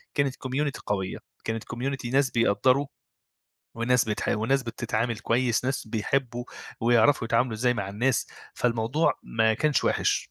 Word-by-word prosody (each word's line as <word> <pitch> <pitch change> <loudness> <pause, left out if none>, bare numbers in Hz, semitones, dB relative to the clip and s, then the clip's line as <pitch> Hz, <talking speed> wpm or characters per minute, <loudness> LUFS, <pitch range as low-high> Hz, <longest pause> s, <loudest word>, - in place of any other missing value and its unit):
كانت 140 -2 +1
community 135 +2 -2
قوية، 95 -2 -2 0.3
كانت 115 -1 -2
community 125 0 -4
ناس 135 -1 +3
بيقدّروا، 125 +5 +2 0.9
وناس 125 +2 +2
بتحاول 105 0 -1
وناس 135 +3 +2
بتتعامل 115 -1 -2
كويس، 120 +1 +1
ناس 135 -4 -2
بيحبّوا، 120 +2 -1 0.4
ويعرفوا 120 +2 +4
يتعاملوا 115 0 +1
إزاي 125 +2 +1
مع 100 -3 -3
الناس، 120 +5 0 0.3
فالموضوع 120 +6 +1
ما 110 0 +1
كانش 150 -1 +1
وحِش. - - +1
120 Hz, 135 wpm, -26 LUFS, 115-130 Hz, 0.9 s, ويعرفوا